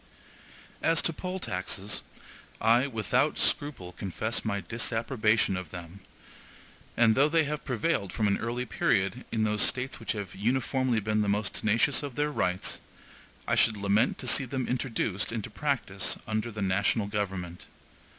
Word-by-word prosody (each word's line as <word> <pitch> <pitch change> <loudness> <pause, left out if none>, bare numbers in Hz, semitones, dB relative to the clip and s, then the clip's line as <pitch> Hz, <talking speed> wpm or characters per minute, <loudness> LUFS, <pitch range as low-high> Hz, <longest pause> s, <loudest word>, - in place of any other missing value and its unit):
As 165 -1 +3
to 165 - +1
poll 185 +3 -4
taxes, 95 - -2 0.6
I, 120 +4 +4
without 110 -6 +1
scruple, 130 -12 0
confess 105 +5 -2
my 100 -2 -1
disapprobation 115 -1 0
of 90 -3 -5
them; 90 +2 -9 1.0
and 115 -1 +6
though 140 +5 +4
they 165 0 +3
have 150 0 -3
prevailed 125 - 0
from 110 - +1
an 100 - +1
early 120 +2 -2
period 110 +1 0
in 110 -1 +1
those 105 -1 +2
States(1) 130 +1 +1
which - - -2
have 100 -5 -5
uniformly 125 +2 +1
been 105 +1 +1
the 105 - 0
most 105 0 0
tenacious 115 +6 +2
of 140 -4 -6
their 150 0 0
rights, 90 -8 -1 0.7
I - - +1
should 110 -2 +3
lament 100 +4 +2
to 125 - -6
see 130 - +4
them 130 0 -3
introduced 115 -6 -1
into 115 -1 -4
practice 115 -8 0
under 110 +1 -2
the 105 -1 -4
national 100 +3 +1
government. 95 -4 -4
110 Hz, 155 wpm, -29 LUFS, 100-130 Hz, 1.0 s, and